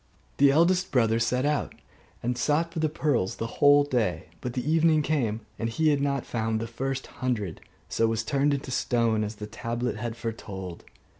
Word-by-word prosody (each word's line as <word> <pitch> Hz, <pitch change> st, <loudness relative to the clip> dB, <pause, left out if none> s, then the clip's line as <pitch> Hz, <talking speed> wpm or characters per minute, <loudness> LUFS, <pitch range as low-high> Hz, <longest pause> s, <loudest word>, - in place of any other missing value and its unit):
The 140 Hz, 0 st, +6 dB
eldest 175 Hz, +5 st, +3 dB
brother 115 Hz, -4 st, +3 dB
set 125 Hz, +3 st, +1 dB
out, 150 Hz, 0 st, 0 dB, 0.5 s
and 125 Hz, +1 st, 0 dB
sought 155 Hz, +6 st, +1 dB
for 165 Hz, -, -3 dB
the 155 Hz, -1 st, +1 dB
pearls 140 Hz, -11 st, 0 dB
the 115 Hz, -, -3 dB, 0.2 s
whole 145 Hz, 0 st, +7 dB
day: 110 Hz, -, -1 dB
but 125 Hz, -, -4 dB
the 125 Hz, +2 st, -3 dB
evening 160 Hz, -1 st, +4 dB
came, 120 Hz, -8 st, 0 dB, 0.2 s
and 115 Hz, -, -1 dB
he 155 Hz, +8 st, +2 dB
had 145 Hz, -2 st, +2 dB
not 140 Hz, -2 st, 0 dB
found 110 Hz, -1 st, -1 dB
the 115 Hz, -, -3 dB
first 135 Hz, +3 st, -3 dB, 0.2 s
hundred: 110 Hz, -9 st, -2 dB, 0.3 s
so 115 Hz, -, +1 dB
he -, -, +2 dB
was 110 Hz, -1 st, -1 dB
turned 140 Hz, +5 st, +2 dB
into 140 Hz, -1 st, -6 dB
stone 115 Hz, -3 st, +1 dB
as 105 Hz, +1 st, -4 dB
the 105 Hz, -, -7 dB
tablet 115 Hz, +2 st, -3 dB
had 115 Hz, +1 st, -4 dB
foretold. 95 Hz, -6 st, -6 dB
125 Hz, 195 wpm, -27 LUFS, 115-145 Hz, 0.5 s, whole